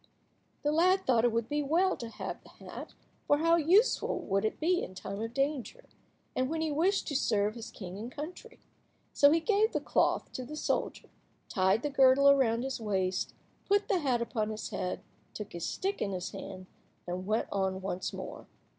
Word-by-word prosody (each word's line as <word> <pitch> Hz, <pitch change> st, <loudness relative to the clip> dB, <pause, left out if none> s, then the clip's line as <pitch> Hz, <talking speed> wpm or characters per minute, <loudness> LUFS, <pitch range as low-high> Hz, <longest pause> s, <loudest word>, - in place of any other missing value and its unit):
The 295 Hz, -, +2 dB
lad 365 Hz, +5 st, +3 dB
thought 240 Hz, -3 st, +3 dB
it 240 Hz, -, +3 dB
would 230 Hz, 0 st, -1 dB
be 295 Hz, +3 st, 0 dB
well 340 Hz, +7 st, +2 dB
to 235 Hz, -, -6 dB
have -, -, -6 dB
the -, -, -17 dB
hat, -, -, -10 dB, 0.3 s
for 290 Hz, -, +5 dB
how 330 Hz, +2 st, +4 dB
useful 365 Hz, +9 st, +3 dB
would 195 Hz, +1 st, 0 dB
it 220 Hz, -, -1 dB
be 355 Hz, +3 st, +2 dB
in 185 Hz, -, -6 dB
time 200 Hz, +2 st, -5 dB
of 225 Hz, 0 st, -3 dB
danger, 285 Hz, -, -1 dB, 0.5 s
and 255 Hz, +1 st, 0 dB
when 325 Hz, +1 st, -2 dB
he 320 Hz, -1 st, 0 dB
wished 360 Hz, +7 st, +1 dB
to 290 Hz, -, -3 dB
serve 210 Hz, -5 st, +2 dB
his 230 Hz, -1 st, -8 dB
king 190 Hz, -1 st, -8 dB
and 235 Hz, +3 st, -6 dB
country. 355 Hz, -, -8 dB, 0.6 s
So 285 Hz, -, +6 dB
he 325 Hz, +3 st, +4 dB
gave 425 Hz, +5 st, +2 dB
the -, -, +1 dB
cloth -, -, +1 dB
to 255 Hz, -, -5 dB
the 300 Hz, +5 st, -7 dB
soldier, -, -, -2 dB, 0.4 s
tied 190 Hz, +4 st, +2 dB
the 295 Hz, -, -1 dB
girdle 270 Hz, 0 st, +6 dB
again 280 Hz, 0 st, +7 dB
round 230 Hz, -2 st, +2 dB
his 265 Hz, -1 st, -3 dB
waist, 190 Hz, -3 st, -1 dB, 0.3 s
put 405 Hz, +3 st, +2 dB
the 385 Hz, -4 st, +3 dB
hat 255 Hz, -6 st, +1 dB
upon 220 Hz, -2 st, -2 dB
his 215 Hz, 0 st, -5 dB
head, 180 Hz, -, -3 dB, 0.3 s
took 210 Hz, -, -7 dB
his 170 Hz, -1 st, -3 dB
stick 395 Hz, +1 st, -2 dB
in 200 Hz, -, -1 dB
his 180 Hz, 0 st, -4 dB
hand, 185 Hz, -1 st, -8 dB, 0.4 s
and 180 Hz, +1 st, -4 dB
went 215 Hz, +2 st, +1 dB
on 190 Hz, -1 st, 0 dB
once 185 Hz, -1 st, -3 dB
more. -, -, -8 dB
255 Hz, 200 wpm, -31 LUFS, 210-320 Hz, 0.6 s, again